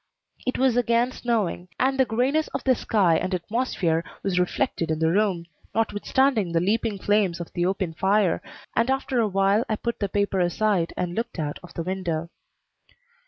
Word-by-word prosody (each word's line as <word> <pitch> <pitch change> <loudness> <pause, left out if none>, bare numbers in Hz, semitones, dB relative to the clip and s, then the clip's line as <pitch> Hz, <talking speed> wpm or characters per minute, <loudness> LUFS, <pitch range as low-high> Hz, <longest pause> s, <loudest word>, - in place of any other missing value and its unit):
It 255 - 0
was 260 -2 +3
again 240 +1 +2
snowing, 215 -8 -1
and 265 +1 +1
the 265 - +5
grayness 260 +7 +1
of - - -3
the 260 - +4
sky 195 -8 +2
and 185 +2 -1
atmosphere 180 -4 -1 0.2
was 185 -2 +1
reflected 175 -2 0
in 160 - 0
the 160 +1 +2
room, 190 -3 +1 0.3
notwithstanding 225 -1 +1
the 165 - +3
leaping 210 +3 0
flames 195 -3 +1
of 170 - -7
the 175 0 +1
open 190 -3 -1
fire, 190 +1 +2 0.3
and 230 +3 +2
after 265 -1 0
a 225 - +3
while 195 +2 +2
I 215 - +1
put 235 +2 -4
the 200 - -1
paper 200 -1 0
aside 180 0 +1
and 180 -1 -2
looked 230 +2 -3
out 150 -3 -3
of 180 - -14
the 165 - -2
window. 170 -3 -3
200 Hz, 180 wpm, -25 LUFS, 175-230 Hz, 0.3 s, the